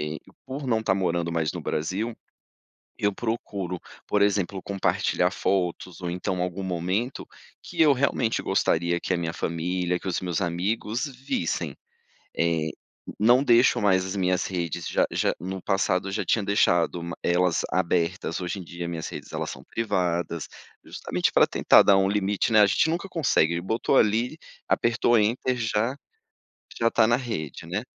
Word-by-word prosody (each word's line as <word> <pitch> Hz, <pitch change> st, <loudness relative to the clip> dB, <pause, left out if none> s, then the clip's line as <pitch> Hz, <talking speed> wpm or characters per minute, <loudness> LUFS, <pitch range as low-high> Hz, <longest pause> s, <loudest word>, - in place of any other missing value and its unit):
E, 75 Hz, +1 st, -4 dB, 0.3 s
por 135 Hz, +2 st, -5 dB
não 115 Hz, -3 st, +2 dB
estar 95 Hz, -, +1 dB
morando 85 Hz, -3 st, -1 dB
mais 80 Hz, -2 st, 0 dB
no -, -, -5 dB
Brasil, 95 Hz, +9 st, -2 dB, 0.8 s
eu 105 Hz, 0 st, +1 dB
procuro, 100 Hz, -6 st, -3 dB, 0.3 s
por 105 Hz, -, +1 dB
exemplo 100 Hz, -1 st, +1 dB
compartilhar 95 Hz, -2 st, 0 dB
fotos 90 Hz, -2 st, -2 dB
ou 85 Hz, -, -2 dB
então 90 Hz, 0 st, -2 dB
algum 90 Hz, +2 st, -3 dB
momento 95 Hz, +7 st, -2 dB, 0.4 s
que -, -, -6 dB
eu 150 Hz, -2 st, +7 dB
realmente 125 Hz, -3 st, 0 dB
gostaria 85 Hz, +1 st, +1 dB
que 95 Hz, -, -1 dB
a -, -, +1 dB
minha 85 Hz, -1 st, -2 dB
família, 90 Hz, +2 st, -1 dB
que 95 Hz, -, -5 dB
os 90 Hz, -, -1 dB
meus 90 Hz, -2 st, -2 dB
amigos 105 Hz, -, -1 dB
vissem. 130 Hz, -, -3 dB, 0.6 s
Eh, 85 Hz, -2 st, +1 dB, 0.5 s
não 120 Hz, +5 st, +5 dB
deixo 120 Hz, -4 st, +4 dB
mais 95 Hz, -2 st, +3 dB
as 95 Hz, -, -4 dB
minhas 90 Hz, -1 st, +1 dB
redes 85 Hz, -4 st, -3 dB
já -, -, +2 dB
já -, -, 0 dB
no 95 Hz, +2 st, -5 dB
passado 95 Hz, 0 st, 0 dB
eu -, -, -5 dB
já 110 Hz, -, -1 dB
tinha 115 Hz, -, +1 dB
deixado 85 Hz, -4 st, +2 dB, 0.2 s
elas 90 Hz, 0 st, +2 dB
abertas, 85 Hz, -1 st, 0 dB
hoje 90 Hz, +2 st, -4 dB
em -, -, -8 dB
dia 85 Hz, 0 st, -6 dB
minhas 80 Hz, -2 st, -4 dB
redes, -, -, -9 dB
elas -, -, -3 dB
são -, -, -9 dB
privadas, 85 Hz, -7 st, -1 dB, 0.4 s
justamente -, -, -2 dB
para -, -, +6 dB
tentar -, -, +5 dB
dar 100 Hz, -, +5 dB
um 95 Hz, 0 st, +3 dB
limite, 105 Hz, +2 st, 0 dB
né, 105 Hz, -1 st, +7 dB
gente 105 Hz, +11 st, +2 dB
nunca 175 Hz, +4 st, -2 dB
consegue, 85 Hz, -, +1 dB
botou 110 Hz, +8 st, 0 dB
ali, 115 Hz, +8 st, +2 dB, 0.3 s
apertou 120 Hz, 0 st, +3 dB
"enter", 120 Hz, +4 st, +1 dB
já 115 Hz, +2 st, 0 dB, 0.8 s
já 115 Hz, -, +3 dB
tá 110 Hz, -2 st, +4 dB
na 120 Hz, -, +4 dB
rede, 110 Hz, -, -5 dB
né? 100 Hz, +7 st, -2 dB
95 Hz, 165 wpm, -25 LUFS, 85-110 Hz, 0.8 s, eu